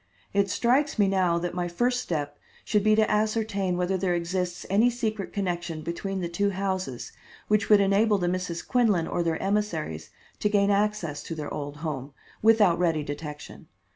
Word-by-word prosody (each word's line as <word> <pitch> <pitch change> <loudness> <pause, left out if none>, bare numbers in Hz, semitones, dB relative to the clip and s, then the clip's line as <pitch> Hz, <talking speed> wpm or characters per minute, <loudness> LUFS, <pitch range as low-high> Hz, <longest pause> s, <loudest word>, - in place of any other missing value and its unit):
"It 200 0 +2
strikes 250 +8 +2
me 205 -2 +4
now 185 -3 +2
that 175 0 -3
my 175 0 -2
first 245 +8 0
step 145 -9 -3 0.3
should 210 -2 +1
be 215 0 +5
to 215 0 +3
ascertain 210 -4 0
whether 180 +1 0
there 180 -1 0
exists 175 +1 -2
any 215 +6 +4
secret 220 -5 -3
connection 175 -5 -3
between 190 +4 -3
the 175 - -1
two 200 +4 0
houses 190 -9 -3 0.4
which 210 -1 +1
would 210 -1 +7
enable 200 +2 +3
the 175 -2 -1
Misses 180 -1 -2
Quinlan 215 -10 +2
or 175 - -1
their 165 -1 0
emissaries 170 - -2 0.3
to 210 - +1
gain 205 -1 +3
access 200 -7 0
to 165 - -6
their 150 -2 -5
old 145 0 -5
home, 140 -2 -4 0.3
without 210 -6 +5
ready 165 -4 +1
detection. 150 +1 -8
190 Hz, 175 wpm, -26 LUFS, 170-210 Hz, 0.4 s, would